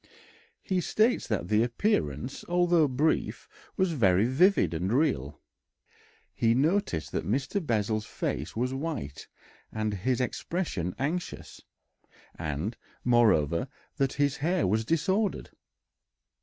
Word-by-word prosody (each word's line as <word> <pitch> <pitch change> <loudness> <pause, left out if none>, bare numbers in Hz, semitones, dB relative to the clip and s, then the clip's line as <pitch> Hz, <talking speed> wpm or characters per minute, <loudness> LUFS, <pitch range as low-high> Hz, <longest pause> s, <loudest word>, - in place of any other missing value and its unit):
He 185 -3 0
states 220 +7 +1
that 100 -6 -1
the 105 +3 +3
appearance, 115 - -1
although 175 -3 +3
brief, 145 +5 0 0.3
was 190 -3 +2
very 100 - +3
vivid 130 - +3
and 90 +5 -1
real. 115 - 0 0.9
He 115 0 +2
noticed 150 - 0
that - - -2
Mr. 135 - -1
Bessel's 110 -4 -1
face - - -3
was 125 +3 -1
white 135 - -5 0.4
and 110 -1 -2
his 120 +6 -1
expression 125 - -2
anxious, 160 +7 -4 0.7
and, 80 - -3 0.3
moreover, 110 - +3 0.3
that 135 -1 +1
his 145 -1 +1
hair 170 +3 +1
was 110 +4 +1
disordered. 190 - 0
125 Hz, 115 wpm, -28 LUFS, 100-165 Hz, 0.9 s, the